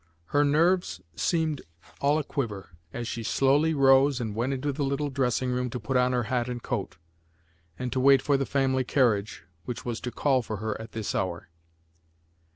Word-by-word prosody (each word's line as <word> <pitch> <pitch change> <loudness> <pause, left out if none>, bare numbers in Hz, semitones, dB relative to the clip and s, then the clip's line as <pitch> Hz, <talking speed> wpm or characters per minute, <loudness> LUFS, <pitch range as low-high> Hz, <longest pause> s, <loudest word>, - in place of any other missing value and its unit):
Her 145 0 +5
nerves 165 +6 +2 0.2
seemed 160 - 0 0.4
all 145 +2 +3
aquiver 115 - -4 0.2
as 120 +3 -5
she 115 - -4
slowly 140 +7 +2
rose 135 0 +5
and 110 -3 -3
went 120 +5 -1
into 135 +2 -1
the 145 +1 -2
little 140 +1 -1
dressing 130 -1 0
room 125 0 -1
to 125 - -5
put 115 +5 -3
on 125 0 +3
her 125 -1 +1
hat 120 +1 -1
and 120 -1 -5
coat, 95 -9 -3 0.8
and 125 -1 -3
to 130 - 0
wait 135 +1 +6
for 140 +2 +1
the 135 0 0
family 135 -1 +1
carriage 115 - +1 0.2
which 120 - -6
was 120 -2 -3
to 125 - -3
call 135 -1 +2
for 110 -2 -5
her 110 +1 -3
at 110 - -10
this 110 -2 -3
hour. 85 -3 -3
130 Hz, 185 wpm, -27 LUFS, 120-140 Hz, 0.8 s, wait